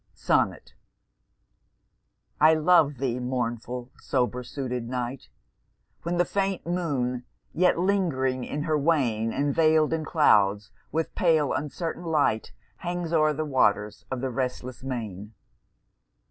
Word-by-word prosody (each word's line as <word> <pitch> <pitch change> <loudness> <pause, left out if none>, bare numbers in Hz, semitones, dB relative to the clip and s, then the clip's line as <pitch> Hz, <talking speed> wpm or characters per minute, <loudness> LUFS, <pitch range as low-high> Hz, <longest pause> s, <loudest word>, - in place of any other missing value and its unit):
SONNET - - 0 1.7
I 155 +1 +6
love 155 -3 +4
thee, 125 -1 -1
mournful 125 0 -3
sober 125 -1 -1
suited 125 -2 -4
Night, 125 +1 -4 0.7
When 170 +2 -2
the 175 - +3
faint 195 0 -1
Moon, 140 -8 -1 0.3
yet 180 +1 +3
lingering 160 -9 0
in 150 +3 -3
her 155 -2 +1
wane 125 -8 +1
And 140 +2 0
veil'd 155 0 +3
in 160 -1 -1
clouds, 105 - +3 0.2
with 160 +1 -2
pale 160 -5 +2
uncertain 165 +4 -4
light 150 -9 +1 0.3
Hangs 175 -1 -4
o'er 155 -1 +4
the 155 +1 -2
waters 105 -7 +1
of 130 -2 -3
the 130 -1 -2
restless 125 0 -4
main. 110 -5 -6
140 Hz, 120 wpm, -26 LUFS, 125-160 Hz, 1.7 s, I